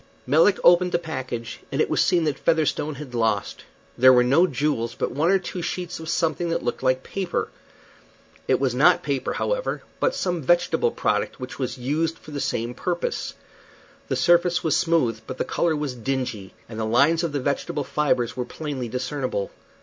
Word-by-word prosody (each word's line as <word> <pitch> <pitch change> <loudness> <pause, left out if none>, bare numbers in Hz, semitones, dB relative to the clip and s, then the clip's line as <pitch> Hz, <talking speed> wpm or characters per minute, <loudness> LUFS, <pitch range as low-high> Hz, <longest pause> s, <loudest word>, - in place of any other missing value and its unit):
Melick 165 +9 +4
opened 175 +1 +5
the - - +4
package, 130 -8 -5
and - - -2
it - - +3
was - - +1
seen 175 -3 +3
that 150 -3 -1
Featherstone 155 -2 +1
had 135 -2 -9
lost. 110 -4 -1 0.3
There 130 +1 +7
were 125 -1 +5
no 140 +9 +4
jewels, 130 -5 -1
but - - -2
one 155 +5 +1
or 195 - +5
two 180 -1 -6
sheets 180 0 -4
of 160 0 -7
something 170 +1 0
that 165 - -1
looked - - -2
like 130 0 +1
paper. 190 -3 -3 1.0
It - - +3
was 130 -3 +1
not 155 +8 +4
paper, 140 -3 -2
however, - - -2 0.2
but - - +1
some 175 -3 -1
vegetable 175 - +2
product - - -1
which 125 +1 -7
was 130 -2 -3
used 155 +6 -1
for 155 - -13
the 145 - -4
same 120 +1 -2
purpose. 175 +5 -3 0.7
The - - -1
surface 175 0 +3
was 160 - +2
smooth, 155 -10 +1
but 130 - -6
the - - -1
color 165 -2 0
was 150 -3 -3
dingy, 120 -5 -4
and 110 -1 -8
the - - -1
lines 140 +9 +3
of 170 - -1
the 145 - -1
vegetable 140 +2 -2
fibres 130 -6 0
were 125 - -2
plainly 135 -3 -5
discernible. 125 -4 -3
145 Hz, 190 wpm, -24 LUFS, 125-170 Hz, 1.0 s, There